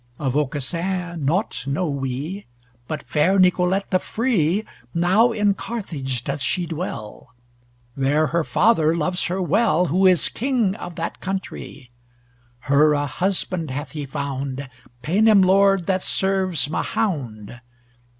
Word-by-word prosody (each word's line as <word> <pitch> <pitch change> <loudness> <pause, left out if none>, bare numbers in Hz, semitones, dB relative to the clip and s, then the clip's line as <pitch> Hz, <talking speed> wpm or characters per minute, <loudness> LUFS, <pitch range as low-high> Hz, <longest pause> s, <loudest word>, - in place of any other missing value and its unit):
Of 135 -3 -2
Aucassin 165 +4 -2
nought 170 - -1
know 160 +6 0
we, 140 +7 -4 0.4
But 155 -1 -4
fair 170 +6 +2
Nicolete 185 +1 +2
the 185 - +3
free 215 -5 0 0.3
Now 190 +8 +4
in 210 -2 +2
Carthage 155 - -4
doth 140 +1 -3
she 175 +6 0
dwell, 140 - -6 0.6
There 140 +3 +2
her 170 +2 0
father 165 -5 +3
loves 180 +3 0
her 180 +2 -2
well, 185 -1 +2
Who 190 +1 +5
is 180 -3 +4
king 240 -5 0
of 175 -5 -8
that 165 0 -4
countrie. 190 -9 -6 0.7
Her 145 +3 +4
a 145 0 0
husband 180 +1 -2
hath 145 +4 -5
he 150 -3 -5
found, 135 0 -4 0.4
Paynim 205 +4 +4
lord 195 -1 +4
that 190 0 0
serves 190 -6 +1
Mahound! 135 - -3
170 Hz, 130 wpm, -22 LUFS, 145-195 Hz, 0.7 s, Who